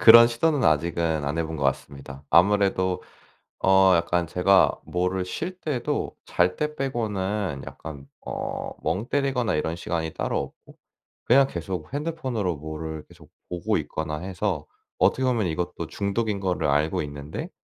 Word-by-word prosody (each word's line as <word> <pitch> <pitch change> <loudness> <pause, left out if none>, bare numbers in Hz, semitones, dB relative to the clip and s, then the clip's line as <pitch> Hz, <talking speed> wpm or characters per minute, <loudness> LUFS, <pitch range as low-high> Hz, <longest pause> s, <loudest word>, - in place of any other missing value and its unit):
그런 115 +1 +10
시도는 130 +3 +1
아직은 80 0 +2
안 75 +3 -2
해 85 - +1
본 80 0 -5
것 70 - -5
같습니다. 70 0 -3
아무래도 95 0 +3 0.6
어 95 0 +6
약간 85 0 +1
제가 95 +3 +4
뭐를 90 +1 -1
쉴 175 - -5
때도 135 -8 -2
잘 90 +1 +2
때 150 0 -2
빼고는 105 - -2
약간 70 -3 -9 0.2
어 - - -4
멍 95 +8 -1
때리거나 135 - +1
이런 80 +2 -1
시간이 80 -2 -3
따로 - - -1 0.2
없고 - - -17 0.5
그냥 135 +3 +6
계속 85 - -5
핸드폰으로 130 - -2
뭐를 80 +1 -6
계속 - - -17 0.2
보고 90 -1 0
있거나 75 -1 -3
해서 90 -3 -2 0.3
어떻게 130 - +3
보면 120 -6 +2
이것도 85 +1 -3
중독인 100 +1 -1
거를 95 -2 0
알고 75 +3 +2
있는데 70 0 -6
90 Hz, 305 characters per minute, -25 LUFS, 80-115 Hz, 0.6 s, 그런